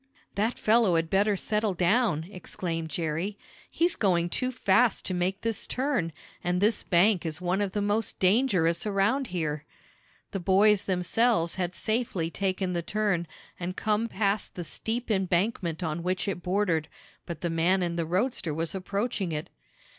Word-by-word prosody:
"That 220 Hz, +4 st, 0 dB
fellow 215 Hz, -5 st, +4 dB
had 165 Hz, 0 st, 0 dB
better 200 Hz, +2 st, +3 dB
settle 210 Hz, 0 st, 0 dB
down!" 180 Hz, -2 st, +2 dB
exclaimed 165 Hz, -3 st, -4 dB
Jerry. 165 Hz, +5 st, -2 dB, 0.3 s
"He's 340 Hz, +1 st, +1 dB
going 175 Hz, -4 st, +2 dB
too 255 Hz, 0 st, 0 dB
fast 230 Hz, -1 st, +2 dB
to 185 Hz, -, -1 dB
make 185 Hz, +2 st, -1 dB
this 225 Hz, -2 st, -2 dB
turn, 255 Hz, -, -1 dB, 0.3 s
and 180 Hz, 0 st, +1 dB
this 210 Hz, +2 st, +2 dB
bank 185 Hz, +1 st, +3 dB
is 160 Hz, -1 st, -3 dB
one 180 Hz, +2 st, 0 dB
of 195 Hz, -2 st, -1 dB
the 205 Hz, -, 0 dB
most 205 Hz, +1 st, 0 dB
dangerous 190 Hz, -4 st, +2 dB
around 210 Hz, +7 st, +1 dB
here." 155 Hz, -5 st, -2 dB, 0.7 s
The 195 Hz, -, -2 dB
boys 195 Hz, +3 st, +4 dB
themselves 185 Hz, 0 st, +1 dB
had 180 Hz, -1 st, -2 dB
safely 215 Hz, -7 st, -1 dB
taken 190 Hz, -1 st, -1 dB
the 170 Hz, -, 0 dB
turn, 195 Hz, -2 st, 0 dB, 0.3 s
and 180 Hz, +1 st, -4 dB
come 215 Hz, +1 st, +1 dB
past 200 Hz, -1 st, -1 dB
the 175 Hz, -, -4 dB
steep 225 Hz, +7 st, -3 dB
embankment 185 Hz, -2 st, 0 dB
on 160 Hz, +1 st, -2 dB
which 185 Hz, +3 st, -1 dB
it 190 Hz, -2 st, -2 dB
bordered, 180 Hz, -4 st, 0 dB, 0.4 s
but 170 Hz, -3 st, -6 dB
the 170 Hz, -, -1 dB
man 175 Hz, +3 st, +2 dB
in 170 Hz, -1 st, -1 dB
the 170 Hz, -1 st, -1 dB
roadster 180 Hz, -, 0 dB
was 165 Hz, 0 st, -1 dB
approaching 195 Hz, 0 st, -2 dB
it. 150 Hz, -1 st, -4 dB
190 Hz, 160 wpm, -28 LUFS, 170-210 Hz, 0.7 s, fellow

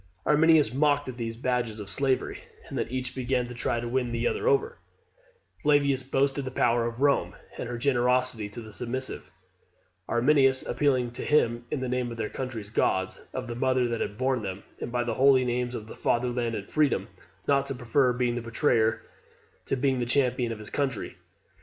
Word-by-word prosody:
Arminius 150 Hz, -4 st, +5 dB
mocked 145 Hz, +1 st, +2 dB
at 125 Hz, -, -7 dB
these 115 Hz, -1 st, -4 dB
as 115 Hz, -, -17 dB
badges 120 Hz, -3 st, 0 dB
of 105 Hz, -, -7 dB
slavery; 135 Hz, +2 st, 0 dB, 0.3 s
and -, -, -7 dB
then -, -, -1 dB
each 130 Hz, 0 st, -4 dB
began 125 Hz, -1 st, 0 dB
to 120 Hz, -, -8 dB
try 120 Hz, 0 st, -1 dB
to 120 Hz, -, -4 dB
win 125 Hz, 0 st, -1 dB
the 120 Hz, 0 st, -1 dB
other 440 Hz, -, -1 dB
over; 450 Hz, +1 st, +2 dB, 0.8 s
Flavius 140 Hz, -2 st, +3 dB
boasting 135 Hz, +1 st, 0 dB
the 130 Hz, -, -4 dB
power 120 Hz, -2 st, +2 dB
of 120 Hz, +3 st, -4 dB
Rome, 140 Hz, -1 st, +2 dB, 0.2 s
and -, -, -5 dB
her 120 Hz, -, -3 dB
generosity 125 Hz, -3 st, +1 dB
to 110 Hz, +3 st, -8 dB
the 110 Hz, -1 st, -11 dB
submissive; 130 Hz, +3 st, -4 dB, 0.8 s
Arminius 135 Hz, +1 st, +4 dB
appealing 125 Hz, -2 st, +1 dB
to 120 Hz, -, -7 dB
him 120 Hz, -5 st, +2 dB
in 140 Hz, -, -2 dB
the 130 Hz, -, -2 dB
name 125 Hz, -1 st, -1 dB
of 115 Hz, -, -7 dB
their 110 Hz, -1 st, -2 dB
country's 115 Hz, -6 st, -5 dB
gods, 95 Hz, -3 st, 0 dB
of 130 Hz, -1 st, -4 dB
the 120 Hz, -, -5 dB
mother 130 Hz, 0 st, +1 dB
that 115 Hz, -1 st, -2 dB
had 105 Hz, -, -3 dB
borne 130 Hz, -1 st, +1 dB
them, 95 Hz, -1 st, -5 dB, 0.2 s
and -, -, -5 dB
by 120 Hz, 0 st, 0 dB
the 120 Hz, -, -2 dB
holy 130 Hz, -1 st, +5 dB
names 125 Hz, 0 st, -1 dB
of 110 Hz, -, -6 dB
fatherland 120 Hz, -1 st, 0 dB
and 100 Hz, -2 st, -7 dB
freedom, 150 Hz, -3 st, +2 dB, 0.4 s
not 140 Hz, -1 st, +3 dB
to 135 Hz, -, -3 dB
prefer 125 Hz, +2 st, +2 dB
being 125 Hz, -1 st, 0 dB
the 120 Hz, -, -3 dB
betrayer 115 Hz, -2 st, +1 dB, 0.6 s
to -, -, +1 dB
being 130 Hz, 0 st, +1 dB
the 120 Hz, -, 0 dB
champion 125 Hz, -2 st, +1 dB
of 115 Hz, -, -4 dB
his 105 Hz, -1 st, -10 dB
country. 135 Hz, -6 st, -2 dB
125 Hz, 195 wpm, -27 LUFS, 120-135 Hz, 0.8 s, Arminius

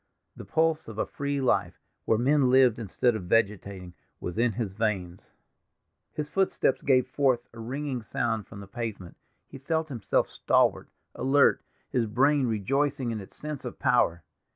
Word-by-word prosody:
The -, -, -10 dB
pulse 160 Hz, 0 st, +1 dB
of 110 Hz, -2 st, -9 dB
a -, -, 0 dB
free 140 Hz, 0 st, -3 dB
life, 130 Hz, -, 0 dB, 0.3 s
where 110 Hz, -, +3 dB
men 135 Hz, +2 st, +3 dB
lived 125 Hz, -3 st, +5 dB
instead 115 Hz, +3 st, +1 dB
of 100 Hz, -5 st, -5 dB
vegetating, 100 Hz, -3 st, 0 dB, 0.3 s
was 90 Hz, -, -5 dB
in 120 Hz, -1 st, +2 dB
his 100 Hz, -3 st, -3 dB
veins. 95 Hz, -5 st, -3 dB, 0.8 s
His 150 Hz, -1 st, -4 dB
footstep 190 Hz, -6 st, +1 dB
gave 130 Hz, -3 st, +3 dB
forth 130 Hz, -4 st, +1 dB
a 115 Hz, -, -11 dB
ringing 130 Hz, +2 st, -4 dB
sound 110 Hz, 0 st, -2 dB
from 100 Hz, -2 st, -10 dB
the 100 Hz, -, -10 dB
pavement; 110 Hz, -5 st, -6 dB, 0.3 s
he 135 Hz, -, -11 dB
felt 160 Hz, +3 st, -1 dB
himself 115 Hz, -7 st, 0 dB
stalwart, -, -, +2 dB, 0.2 s
alert, 135 Hz, +3 st, +3 dB, 0.3 s
his 125 Hz, -4 st, +1 dB
brain 135 Hz, +5 st, +3 dB
rejoicing 130 Hz, +4 st, 0 dB
in 110 Hz, -2 st, -4 dB
its 95 Hz, -, -13 dB
sense 150 Hz, -2 st, -6 dB
of 125 Hz, -, -6 dB
power. 85 Hz, -9 st, +2 dB
120 Hz, 160 wpm, -27 LUFS, 105-140 Hz, 0.8 s, lived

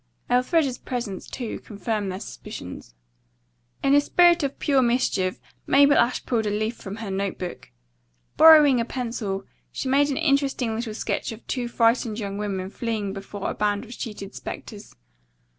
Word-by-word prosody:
Elfreda's 255 Hz, +1 st, +2 dB
presence, 235 Hz, -7 st, -5 dB
too, 240 Hz, -4 st, -5 dB
confirmed 210 Hz, -2 st, -3 dB
their 185 Hz, -, -5 dB
suspicions. -, -, -9 dB, 0.9 s
In 275 Hz, -, +4 dB
a 290 Hz, -, +6 dB
spirit 345 Hz, +3 st, +4 dB
of 280 Hz, -1 st, -2 dB
pure 275 Hz, -3 st, +2 dB
mischief 235 Hz, -7 st, +1 dB, 0.3 s
Mabel 285 Hz, +1 st, +6 dB
Ashe 240 Hz, +1 st, +2 dB
pulled 225 Hz, -3 st, 0 dB
a -, -, +1 dB
leaf 215 Hz, +3 st, -1 dB
from 195 Hz, -2 st, -8 dB
her 220 Hz, -3 st, -6 dB
note 195 Hz, 0 st, -2 dB
book. 180 Hz, -, -7 dB, 0.7 s
Borrowing 300 Hz, -6 st, +8 dB
a -, -, -2 dB
pencil, 230 Hz, -6 st, -4 dB, 0.3 s
she -, -, -4 dB
made 285 Hz, +2 st, +4 dB
an 275 Hz, -, -1 dB
interesting 275 Hz, -6 st, +1 dB
little 220 Hz, -1 st, -4 dB
sketch -, -, -2 dB
of 225 Hz, +1 st, -10 dB
two 245 Hz, -2 st, -2 dB
frightened 230 Hz, -2 st, +2 dB
young 200 Hz, -2 st, -4 dB
women 195 Hz, -2 st, -3 dB
fleeing 215 Hz, -4 st, -3 dB
before 195 Hz, 0 st, -5 dB
a -, -, -4 dB
band 205 Hz, 0 st, 0 dB
of 235 Hz, -, -10 dB
sheeted 210 Hz, -5 st, -7 dB
specters. 210 Hz, -1 st, -8 dB
230 Hz, 160 wpm, -24 LUFS, 205-265 Hz, 0.9 s, Borrowing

